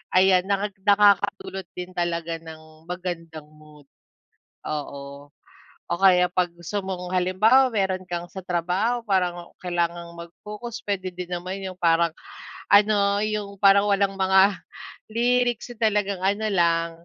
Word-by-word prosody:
ayan, 185 0 +5
naka 200 +1 0 0.2
nakakadulot 200 -2 +3
din 180 0 -7
talaga 170 -1 -2
ng 160 0 -14
magandang 165 -4 -6
mood. 150 -2 -19 0.8
Oo. 140 -1 -6 0.6
O - - -1
kaya 180 -2 +5
'pag 180 -1 -1
gusto 175 +4 -5
mong 185 -1 -4
halimbawa, 215 +9 +4
meron 190 -3 -1
kang 175 -1 -5
sa 190 0 -9
trabaho 180 +7 0
parang 180 -3 0 0.2
kailangang 170 -1 -2
mag-focus, 210 +8 -9
puwede 185 -3 -3
din 180 0 -7
naman 185 +2 -4
yung 185 -1 -7
parang 170 -1 +3 0.6
ano, 205 0 +4
yung 210 -2 -3
parang 200 +1 +5
walang 200 -1 +1
mga 190 +1 +4 0.5
lyrics. 245 +1 +1
Talagang 205 -3 +1
ano 205 +3 0
lang, 170 -2 +2
185 Hz, 125 wpm, -24 LUFS, 170-200 Hz, 0.8 s, ayan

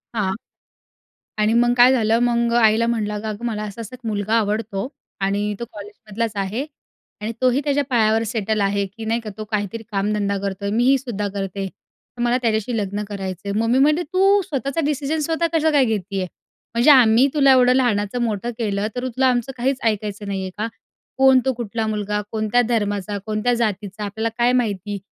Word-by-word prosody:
हां. 190 -3 0 1.1
आणि 215 +1 +2
मग 240 +1 +4
काय 245 +2 +7
झालं 225 -2 +2
मग 235 0 +1
आईला 220 +1 +4
म्हटलं, 215 -3 -1
"अगं-अगं 215 +2 -5
मला 215 -2 -2
असा-असा 215 +3 -7
एक 255 - -11
मुलगा 210 +1 -1
आवडतो 215 0 -1 0.3
आणि 205 +2 0
तो - - -2
कॉलेजमधलाच 210 +1 -5
आहे 225 +9 -3 0.5
आणि 220 +2 -3
तोही 255 +2 +3
त्याच्या 285 -1 +1
पायावर 225 -2 +3
सेटल 215 -1 -1
आहे 200 0 +1
की 220 +4 -10
नाही 230 +2 0
का 215 -2 -7
तो 215 - -4
काहीतरी 210 +1 -3
कामधंदा 200 0 0
करतोय. 200 0 -3
मीही 250 +5 +3
सुद्धा 220 -6 -4
करते. 195 0 -3
तर 240 +5 -13
मला 240 +1 +2
त्याच्याशी 225 +1 0
लग्न 205 0 -2
करायचं 190 -1 -5
आहे." 200 +2 -1
मम्मी 230 +3 +2
म्हणाली, 305 +5 +4
"तू 390 +5 +3
स्वतःचा 275 0 -2
डिसिजन 295 +2 -1
स्वतः 330 +1 +1
कसं 320 -1 +2
काय 280 -3 +5
घेतीये? 200 -4 -2 0.5
म्हणजे 240 +6 +5
आम्ही 250 -1 +6
तुला 275 -2 +5
एवढं 250 -1 +5
लहानाचं 240 -2 +1
मोठं 225 +1 -1
केलं, 205 -2 -1
तरी 255 +1 -2
तुला 260 +2 +1
आमचं 250 +1 +1
काहीच 260 +2 0
ऐकायचं 210 -1 -1
नाही 195 -1 -2
आहे 185 - -4
का? 220 - -1 0.5
कोण? 265 -1 +6
तो 265 - +2
कुठला 225 -1 -3
मुलगा, 210 -1 -1
कोणत्या 220 +2 +1
धर्माचा, 205 -3 -1
कोणत्या 215 +3 0
जातीचा 210 -3 -2
आपल्याला 220 +3 -2
काय 240 +1 +3
माहिती? 205 -1 -4
220 Hz, 180 wpm, -21 LUFS, 205-245 Hz, 1.1 s, काय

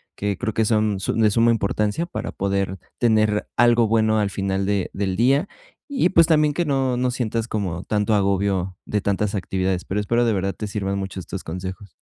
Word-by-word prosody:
que 100 -1 -2
creo 110 - -2
que 110 - +2
son 105 -2 +1
su - - -1
de 110 -1 +3
suma 115 +3 +3
importancia 105 +7 0
para - - -5
poder 95 -1 -2 0.2
tener 110 -2 +2
algo 120 -1 +4
bueno 110 0 +2
al 100 -1 0
final 95 0 -1
de 100 -2 0
del 95 -2 -2
día 135 - +3 0.4
y 270 -11 +1
pues 170 -3 +5
también 150 -2 +3
que 175 - 0
no 135 -4 0
no 125 0 +1
sientas 115 -2 -2
como 95 -6 -3
tanto 105 0 +1
agobio 95 -2 0
de 105 - -1
tantas 100 +1 -1
actividades, 95 -1 -1
pero 100 +2 -2
espero 120 +4 +1
de 115 - +2
verdad 95 -1 -1
te 105 - -5
sirvan 100 -1 -2
mucho 95 -1 -5
estos 90 +1 -7
consejos. 95 +4 -6
105 Hz, 200 wpm, -22 LUFS, 95-115 Hz, 0.4 s, pues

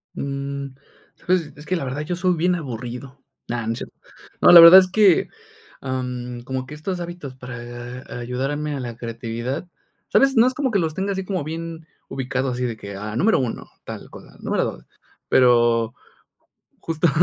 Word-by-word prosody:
Mm, 140 0 -4 0.5
¿sabes?, 175 -4 0
es 150 - -12
que 185 - 0
la 170 - -2
verdad 135 +3 -3
yo 175 +4 -3
soy 185 0 +1
bien 180 +2 +2
aburrido. 130 -2 -6 0.3
No, 120 -1 -3
no 115 - 0
es 115 - -6
cierto. - - -9 0.5
No, - - +8
la 175 - +12
verdad 170 +3 +12
es 185 - +1
que, 200 -4 +4 0.5
ah, 130 -1 -2
mm, 125 -1 -5
como 130 +1 -4
que 145 - -10
estos 180 +4 -4
hábitos 175 -6 -7
para 120 0 -8
ayudarme 135 +5 -2
a - - -4
la 120 -2 -5
creatividad, 120 +6 -4 0.4
¿sabes?, 270 0 +4
no 230 +1 +6
es 255 - 0
como 265 -1 -1
que 200 - +2
los 160 -3 -1
tenga 195 +2 -1
así 190 0 -3
como 185 -5 -2
bien 165 +1 -6 0.2
ubicados, 130 0 -2
así 125 0 -1
de 115 -2 -3
que, 100 -2 -8
ah, 105 +2 -5
número 215 - +3
1, 125 -4 -4 0.2
tal - - -8
cosa, - - -14
número - - 0
2, - - -6 0.4
pero 120 -2 +4 0.9
justa 165 +1 0
140 Hz, 185 wpm, -22 LUFS, 125-170 Hz, 0.9 s, la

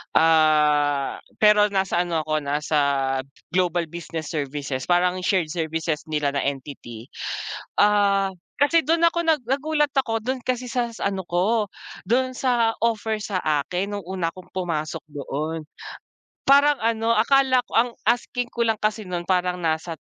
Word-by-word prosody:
ah, 150 -3 +3 0.2
pero 210 0 +6
nasa 190 -3 0
ano 165 -2 -1
ako, 155 0 0
nasa 150 +1 -1 0.7
global 175 -1 +1
business 165 -2 -6
services, 140 -3 -3
parang 180 +1 +2
shared 180 -4 0
services 160 -2 -2
nila 150 -2 0
na 140 - -1
entity. 130 -4 -7 0.7
Ah, 200 -1 +3 0.3
kasi 325 +2 +3
do'n 330 +1 +2
ako 340 0 -2
nag 310 -5 +3
nagulat 295 +4 0
ako, 225 -4 +1
do'n 260 +2 -2
kasi 250 -1 -2
sa 245 -2 0
sa 200 - -1
ano 190 -2 -5
ko, 205 +5 +1 0.4
do'n 255 +4 +2
sa 240 -3 +1
offer 220 -1 0
sa 200 -3 -3
akin 175 +6 -1
no'ng 195 - -10
una 180 -3 -2
akong 185 +1 -14
pumasok 165 -3 -3
doon. 150 +3 -4 0.8
Parang 285 0 +5
ano, 230 0 +1
akala 260 +3 +4
ko - - -19
ang 240 +2 +4 0.2
asking 245 0 -1
ko 235 -1 -1
lang 225 -1 +2
kasi 215 -1 -1
no'n 175 -1 -3
parang 180 0 0
nasa 160 +1 -1
185 Hz, 150 wpm, -23 LUFS, 155-230 Hz, 0.8 s, pero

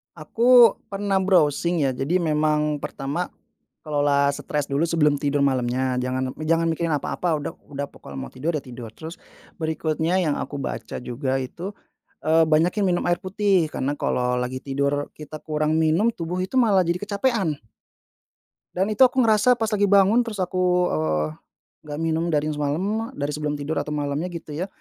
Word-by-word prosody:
Aku 235 +9 +5
pernah 195 -1 0
browsing 170 -3 +2
ya, 135 - +2
jadi 135 +7 -2
memang 150 -1 +1
pertama 140 +6 -3 0.6
kelola 145 -2 +2
stres 150 -1 -3
dulu 140 +3 0
sebelum 160 -3 +2
tidur 145 0 -1
malamnya, 130 -1 +1
jangan 130 +1 -2
me 155 - -7
jangan 165 +1 +2
mikirin 165 0 -1
apa-apa 155 +2 -1
udah 145 - -5 0.2
udah 140 0 -3
pokoknya 70 - -11
mau 65 -1 -7
tidur, 155 +6 -2
ya 150 - -3
tidur. 120 -2 -9
Terus 160 +2 -8 0.4
berikutnya 160 +1 -1
yang 155 -5 +1
aku - - -5
baca 115 -4 -5
juga 130 +2 -2
itu, 165 +9 -6 0.5
eee, 160 +1 +4
banyakin 165 +6 +2
minum 175 -1 +1
air 175 0 +1
putih 190 -3 +1
karena 140 +2 -2
kalau 125 -3 0
lagi 125 +1 -3
tidur 140 +1 -1
kita 155 0 -9
kurang 155 0 0
minum, 165 +9 +3
tubuh 175 -2 -4
itu 190 - -6
malah 205 -6 +4
jadi 170 +1 0
kecapekan. 200 - 0 1.2
Dan 190 +4 0
itu 215 +5 +5
aku 255 0 +1
ngerasa 225 +2 +4
pas 225 -2 -1
lagi 205 -1 +2
bangun 200 +4 +5
terus 215 -4 -6
aku, 180 0 +1
eee, 80 0 0 0.6
gak 145 0 -5
minum 165 +1 0
dari 155 -2 0
semalam, 180 +10 -2
dari 145 +1 -2
sebelum 150 0 -2
tidur 145 +2 -2
atau 150 - -4
malamnya 145 +3 -2
gitu 170 -3 -8
ya, 165 +6 -3
155 Hz, 170 wpm, -23 LUFS, 145-185 Hz, 1.2 s, Aku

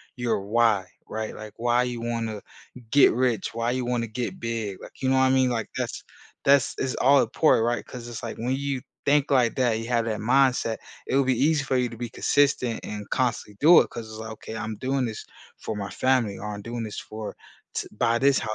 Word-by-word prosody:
your 120 -4 0
"Why," 110 -1 +2 0.2
right? 110 0 -4
Like, 110 -1 -9
why 120 +1 +2
you 125 -1 -3
wanna 115 -3 -3 0.5
get 140 - +6
rich, 120 -4 0
why 115 +1 -1
you 125 0 -1
wanna 120 -1 -1
get 125 - -4
big. 115 - -3
Like, - - -13
you 130 - +1
know 130 - +3
what 130 - +5
I 130 - +4
mean? 130 -1 +3
Like, 115 -3 -2
that's - - -3 0.4
that's 140 -1 +4
it's 130 -1 -1
all 140 +1 +5
important, 115 -1 +3
right? 120 0 -1
'Cause 120 -2 -9
it's 120 -2 -7
like, 115 - -5
when 125 +3 -1
you 140 -1 -2 0.3
think 145 0 +3
like 125 -4 +3
that, 125 -3 +2
you 115 +1 -5
have 120 -2 +1
that 110 -2 -2
mindset, 125 -1 +2 0.3
it'll 135 +1 +3
be 130 -2 +1
easy 150 +1 +3
for 135 -1 -1
you 125 -1 +1
to 115 - -10
be 120 0 -4
consistent 130 -2 +1
and 105 -1 -6
constantly 120 -5 -1
do 165 +4 +8
it - - +2
because 115 -2 -8
it's 110 - -9
like, 110 0 -6
"Okay, 110 0 -8
I'm 110 0 -4
doing 130 +1 0
this 110 -2 -6 0.3
for 110 - -5
my 100 -1 -4
family," 125 -6 +1
or 105 - -6
"I'm 100 - -8
doing 120 +1 -4
this 110 -2 -5
for 110 0 -7 0.4
to - - -2
buy 115 +1 +2
this, 140 +1 +3
120 Hz, 225 wpm, -25 LUFS, 110-130 Hz, 0.5 s, do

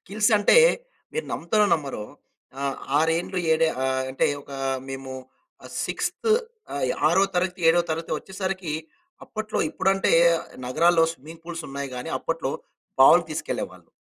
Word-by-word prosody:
Skills 210 +3 0
అంటే 205 - +5 0.6
మీరు 470 - -2
నమ్ముతారో 210 +5 +2
నమ్మరో, 140 -8 -4 0.6
ఆహ్, 140 -1 -1 0.2
ఆరేండ్లు 165 +4 0
ఏడు 160 +1 +3 0.2
ఆహ్, 130 0 0
అంటే 135 - +1 0.2
ఒక - - -17 0.4
మేము 135 0 -6 0.5
ఆహ్, - - -11
6త్ 450 - -2 0.4
ఆహ్, 140 - -1 0.2
ఆరో 185 +4 +4
తరగతి, 180 0 0
ఏడో 175 +1 +3
తరగతి 165 +1 -3
వచ్చేసరికి 190 -4 -4 0.5
అప్పట్లో 215 0 -4
ఇప్పుడంటే 195 - +1 0.5
నగరాల్లో 165 +6 +4
స్విమ్మింగ్ 160 +3 -13
పూల్స్ 170 -1 -6
ఉన్నాయి 140 0 -5
గాని. 125 - -5
అప్పట్లో - - -2 0.5
బావులకి - - +7
తీసుకెళ్ళేవాళ్ళు. - - -5
165 Hz, 130 wpm, -25 LUFS, 140-190 Hz, 0.6 s, బావులకి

